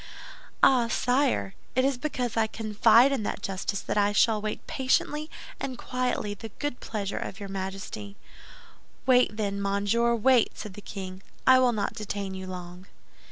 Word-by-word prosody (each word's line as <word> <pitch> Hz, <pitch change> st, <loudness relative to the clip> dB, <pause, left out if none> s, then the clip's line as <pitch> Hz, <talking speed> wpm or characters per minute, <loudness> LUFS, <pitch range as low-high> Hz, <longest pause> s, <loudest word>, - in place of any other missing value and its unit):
"Ah, 245 Hz, -3 st, +6 dB
sire; 250 Hz, -3 st, +1 dB, 0.2 s
it 260 Hz, +1 st, +3 dB
is 270 Hz, -2 st, 0 dB
because 250 Hz, -5 st, -2 dB
I 225 Hz, -1 st, +2 dB
confide 225 Hz, +4 st, +4 dB
in 270 Hz, -4 st, 0 dB
that 205 Hz, -, -4 dB
justice 195 Hz, +1 st, -2 dB
that -, -, -1 dB
I 205 Hz, 0 st, +2 dB
shall 215 Hz, 0 st, +3 dB
wait 215 Hz, 0 st, -4 dB
patiently 300 Hz, +3 st, 0 dB, 0.3 s
and 260 Hz, -2 st, -4 dB
quietly 250 Hz, -5 st, -2 dB
the 220 Hz, +2 st, -8 dB
good 290 Hz, -4 st, -3 dB
pleasure 205 Hz, -3 st, -3 dB
of 195 Hz, -, -6 dB
your 200 Hz, -1 st, -6 dB
Majesty." 190 Hz, -, -5 dB, 0.9 s
"Wait, 250 Hz, -4 st, +4 dB
then, 200 Hz, -2 st, -2 dB
monsieur, 205 Hz, +4 st, +2 dB
wait," 240 Hz, +1 st, +3 dB
said 210 Hz, -, -7 dB
the 210 Hz, -, -10 dB
king; 190 Hz, -2 st, -7 dB, 0.2 s
"I 260 Hz, 0 st, +7 dB
will 255 Hz, -1 st, +4 dB
not 210 Hz, -3 st, -2 dB
detain 205 Hz, -3 st, -4 dB
you 190 Hz, 0 st, -6 dB
long." 180 Hz, 0 st, -8 dB
215 Hz, 160 wpm, -27 LUFS, 195-250 Hz, 0.9 s, I